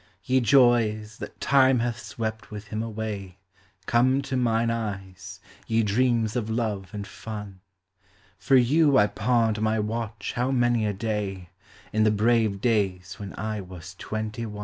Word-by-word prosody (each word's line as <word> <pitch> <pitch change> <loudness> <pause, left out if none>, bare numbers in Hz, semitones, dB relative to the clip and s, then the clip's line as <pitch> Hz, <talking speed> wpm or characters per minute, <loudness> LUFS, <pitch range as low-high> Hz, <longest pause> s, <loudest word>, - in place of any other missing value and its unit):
Ye 130 +5 +2
joys, 115 -4 +3
that - - -8
Time 130 -2 +4
hath 120 0 -1
swept 110 -1 -5
with 105 0 -9
him 110 0 -3
away. 105 -4 -5 0.5
Come 130 +5 +3
to 135 -1 -3
mine 115 -2 +1
eyes, 100 -5 -5 0.3
ye 115 0 +2
dreams 115 +1 +1
of 115 -3 -2
love 110 -5 -2
and 100 -1 -5
fun; 105 -3 -8 0.8
For 135 - +3
you 140 +3 +4
I 105 - +6
pawned 110 0 +1
my 110 0 +1
watch 110 -1 -3
how 125 +1 0
many 120 -4 +2
a 105 - -1
day, 100 -4 -3 0.4
In 110 0 +3
the 110 - +5
brave 110 -1 +2
days 95 -6 0
when 100 -2 -7
I 110 0 -3
was 90 0 -10
twenty 110 +1 -4
one. 105 -1 -8
110 Hz, 155 wpm, -26 LUFS, 105-120 Hz, 0.8 s, I